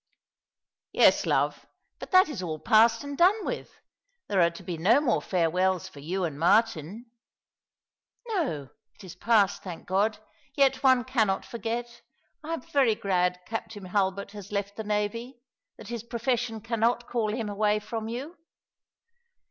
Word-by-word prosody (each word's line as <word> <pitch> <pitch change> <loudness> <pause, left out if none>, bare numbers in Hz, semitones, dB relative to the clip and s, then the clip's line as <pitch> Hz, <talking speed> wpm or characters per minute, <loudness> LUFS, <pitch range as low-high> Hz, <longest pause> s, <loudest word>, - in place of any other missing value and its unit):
" - - -66 0.3
Yes, - - +4
love; - - 0 0.3
but - - -8
that 370 0 +6
is 285 -11 -5
all 160 -4 -4
past 225 - +4
and 285 0 -6
done 380 +7 +3
with. - - -4 0.6
There 195 -3 +2
are 170 - +5
to 170 +3 -12
be 175 -1 -4
no 200 - +4
more 280 -6 +1
farewells 180 0 0
for 145 - -13
you 180 +6 -3
and 150 -4 -3
Martin." 210 +3 +1 0.5
" - - -32
No, 265 - -2 0.3
it 205 - -16
is 180 -3 -9
past, 200 0 +2
thank 180 -4 -8
God! 205 +4 +1 0.4
Yet 275 -1 +3
one 260 -3 +4
cannot 220 -7 0
forget. 235 +1 -5 0.4
I 325 +2 -2
am 325 - -8
very 260 -6 +2
glad 180 -3 0
Captain 220 -3 -6
Hulbert 195 +1 -1
has 205 -2 -10
left 200 0 -3
the 220 - -5
navy 215 +4 -3 0.2
— - - -63
that - - -11
his 235 -2 -4
profession 235 -1 -2
cannot 230 +2 0
call 225 -3 -1
him 225 0 -3
away 210 +1 +1
from 220 +1 -5
you." 265 +9 -6
215 Hz, 165 wpm, -27 LUFS, 190-240 Hz, 0.6 s, that